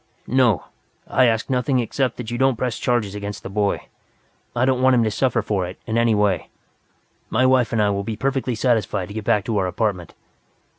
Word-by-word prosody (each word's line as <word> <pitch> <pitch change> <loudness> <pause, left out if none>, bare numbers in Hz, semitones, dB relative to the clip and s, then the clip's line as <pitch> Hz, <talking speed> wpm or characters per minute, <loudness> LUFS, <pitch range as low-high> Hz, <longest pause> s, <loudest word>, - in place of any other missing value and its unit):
"No, 120 - +2 0.4
I 130 - +3
ask 115 -1 0
nothing 130 0 +1
except 125 +2 -1
that 120 -2 -6
you 120 - -3
don't 135 -1 +3
press 125 0 -2
charges 115 -5 0
against 105 0 -6
the - - -7
boy. 100 0 0 0.7
I 120 +1 +2
don't 130 -1 +1
want 130 0 +5
him 120 - +3
to 110 - 0
suffer 120 0 +1
for 100 -4 -1
it 90 - -9
in 110 - -3
any 115 -1 +3
way. 105 -3 +1 0.8
My 130 +3 +2
wife 130 -3 +3
and 115 - 0
I 105 -1 +3
will 100 0 -2
be 110 +1 -4
perfectly 135 -1 -1
satisfied 110 -5 0
to - - -8
get 110 -1 -5
back 105 -2 +2
to 110 -3 0
our 95 - 0
apartment." 90 -2 -2
115 Hz, 210 wpm, -22 LUFS, 105-125 Hz, 0.8 s, want